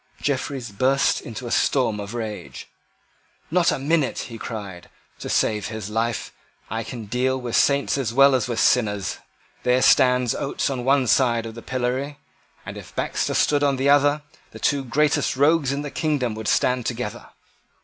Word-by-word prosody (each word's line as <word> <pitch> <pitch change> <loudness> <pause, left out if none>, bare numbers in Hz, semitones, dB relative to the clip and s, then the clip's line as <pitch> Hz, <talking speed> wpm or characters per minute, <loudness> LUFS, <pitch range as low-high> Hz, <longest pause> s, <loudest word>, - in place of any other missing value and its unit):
Jeffreys 135 -4 -3
burst 130 +7 +2
into 120 +2 -8
a 120 - -5
storm 120 -6 +1
of 100 +3 -6
rage. 110 -3 -6 0.8
"Not 175 0 +3
a - - -1
minute," 145 0 0
he 115 -2 -6
cried, 100 -6 -7 0.3
"to - - -6
save 105 -4 +1
his 110 -2 -6
life. 115 +1 -2 0.4
I 115 +1 -2
can 115 0 -7
deal 130 +4 0
with 120 -2 -4
saints 140 0 +2
as 120 -5 -1
well 140 +3 +6
as 125 -3 +1
with 120 -2 -2
sinners. 105 -6 +1 0.4
There 125 +1 +2
stands 125 -2 +4
Oates 140 - -2
on 125 -2 -3
one 135 +1 +3
side 120 -2 +2
of 115 - -7
the 115 - -9
pillory; 130 +4 -2 0.5
and, - - -7
if - - -12
Baxter - - -1
stood 145 -1 +2
on 140 -1 +2
the 135 +2 +2
other, 145 +1 +3 0.3
the - - -12
two 140 -2 +1
greatest 145 +4 +1
rogues 145 0 +3
in 140 +1 -2
the 145 - -6
kingdom 145 -8 -1
would 110 0 -6
stand 125 -2 +1
together." 120 -3 -5
125 Hz, 175 wpm, -23 LUFS, 115-140 Hz, 0.8 s, well